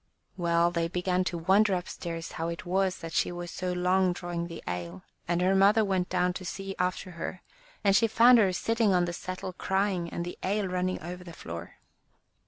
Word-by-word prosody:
Well, 170 -1 +2
they 170 -1 0
began 180 +1 0
to 175 - -2
wonder 190 +4 +4
upstairs 170 -2 -5
how 165 - -3
it 170 +1 -5
was 185 +1 +1
that 165 -1 -7
she - - +1
was 175 0 -6
so 185 -1 -3
long 180 +1 +2
drawing 175 -1 -4
the 165 -1 -9
ale, 90 0 -5 0.2
and 175 +1 +1
her 185 +1 +3
mother 205 +3 +5
went 185 -2 0
down 180 0 +1
to 185 - -6
see 195 +2 -5
after 180 +1 -1
her, 175 +2 -6 0.4
and 200 -1 +4
she 230 +2 +5
found 235 +2 +7
her 195 -4 +4
sitting 220 +1 +1
on 175 -1 +3
the 175 - -4
settle 185 +1 -5
crying, 190 -2 0
and 170 - -4
the 175 - -7
ale 200 +1 0
running 185 0 -1
over 180 +2 -6
the 170 -2 -10
floor. 85 - -8
180 Hz, 200 wpm, -29 LUFS, 170-190 Hz, 0.4 s, found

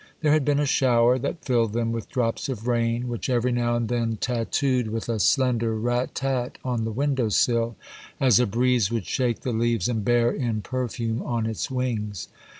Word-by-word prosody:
There 150 -2 +3
had 155 -1 +3
been 145 +1 +2
a 145 - +2
shower 125 -2 +3
that 140 +5 -4
filled 115 -4 +1
them 115 0 0
with 115 -2 -4
drops 120 0 -1
of 115 -4 -5
rain, 120 0 0
which 120 +1 -4
every 125 0 +1
now 120 -1 +1
and 120 -1 -1
then 115 -2 -1
tattooed 125 +2 0
with 115 0 -4
a 115 -2 -1
slender 115 -2 +2
rat 120 +3 -1
tat 130 -2 -2
on 120 -3 -1
the 115 - -2
window 130 -1 0
sill, 115 +2 +1 0.4
as 125 -5 +5
a 125 - +2
breeze 120 0 +2
would 115 -6 -2
shake 120 +5 -1
the 125 - -2
leaves 115 -3 +1
and 115 -4 -1
bear 120 +2 +3
in 115 -5 -2
perfume 120 -3 -3
on 115 -2 -2
its 110 -1 -3
wings. 110 -7 -3
120 Hz, 195 wpm, -25 LUFS, 115-125 Hz, 0.4 s, as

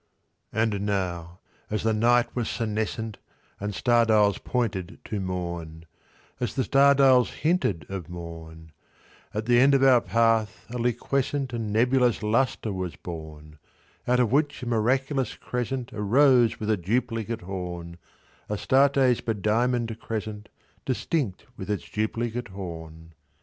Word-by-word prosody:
And 110 -2 0
now, 90 -3 -3 0.3
as 110 - -2
the 110 0 +2
night 120 +2 +2
was 120 -3 -1
senescent, 110 -1 -3 0.4
And 105 0 -4
star 120 +4 +3
dials 105 -3 +3
pointed 105 -8 -2
to 105 - -3
morn— 85 -3 -5 0.5
As 120 -5 -2
the 130 - +1
star 140 +1 +5
dials 130 -3 +5 0.2
hinted 155 - +1
of 95 -4 -6
morn— 80 -2 -9 0.6
At 105 +1 -3
the 120 0 +4
end 140 +2 +6
of 135 - +3
our 130 -3 +6
path 115 -2 +1
a 125 - -4
liquescent 130 +2 -1
And 115 -3 -3
nebulous 125 +1 +2
lustre 110 -1 0
was 95 -2 -4
born, 75 -2 -9 0.5
Out 125 0 +3
of 120 -3 +2
which 140 -1 +1
a - - -3
miraculous 130 +3 0
crescent 125 0 -4
Arose 120 +3 +4
with 110 0 -1
a 110 - +2
duplicate 115 +3 -2
horn— 90 -2 -6 0.5
Astarte's 130 +3 +3
bediamonded 115 +2 0
crescent, 110 -1 -5 0.3
Distinct 130 - -2
with 95 - -7
its 105 - -2
duplicate 115 +3 -2
horn. 80 -4 -9
110 Hz, 135 wpm, -26 LUFS, 95-125 Hz, 0.6 s, end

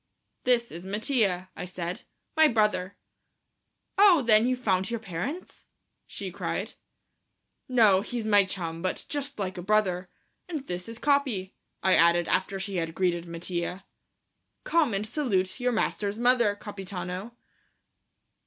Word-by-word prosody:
"This 240 -2 +2
is 170 +2 -8
Mattia," 195 -3 0
I - - -5
said, 180 0 -5 0.3
"my 315 0 +7
brother." 210 -5 +1 1.0
"Oh, 370 -8 +7
then 225 0 +5
you've 255 0 +1
found 190 -4 +1
your 235 -1 -2
parents?" 220 - -6 0.4
she - - -6
cried. - - -3 1.0
"No, 215 -7 +5
he's 230 +1 -4
my 205 -2 +5
chum, 170 -4 -4
but 185 0 -2
just 285 -1 -3
like 190 -3 -3
a - - -4
brother. 185 -2 +1 0.4
And 305 -6 -4
this 180 +1 -5
is 230 - -6
Capi," 260 -10 +1 0.3
I 190 - +4
added, 170 +1 +4
after 190 +1 0
she 195 0 -3
had 165 -1 -2
greeted 175 -2 0
Mattia. 175 +2 -4 0.8
"Come 310 -10 +2
and 200 +2 -1
salute 215 -6 -1
your 250 0 +1
master's 210 -2 -1
mother, 240 -3 +3
Capitano." 195 +1 -6
200 Hz, 135 wpm, -27 LUFS, 180-240 Hz, 1.0 s, my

